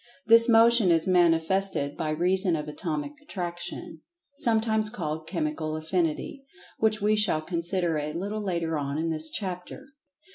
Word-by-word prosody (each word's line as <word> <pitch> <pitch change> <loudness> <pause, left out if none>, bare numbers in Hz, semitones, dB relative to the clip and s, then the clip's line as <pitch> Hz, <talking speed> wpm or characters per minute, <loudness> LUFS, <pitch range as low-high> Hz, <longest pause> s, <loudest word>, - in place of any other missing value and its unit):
This 230 +1 +6
Motion 230 -3 +5
is 165 -1 +3
manifested 175 -3 +2
by 155 - -3
reason 180 +3 +2
of 150 -1 -5
Atomic 150 - -4
Attraction, 175 - -6 0.4
sometimes 220 -3 +1
called 160 -7 -5
"Chemical 155 -2 -3
Affinity," 165 - -2 0.4
which 215 -2 +1
we 210 +1 +3
shall 210 -7 +2
consider 170 -1 -1
a 150 +1 -4
little 200 +6 -4
later 170 -5 -2
on 140 0 -3
in 165 +1 -1
the 155 -1 -2
chapter. 185 +6 -5
175 Hz, 140 wpm, -26 LUFS, 160-210 Hz, 0.4 s, This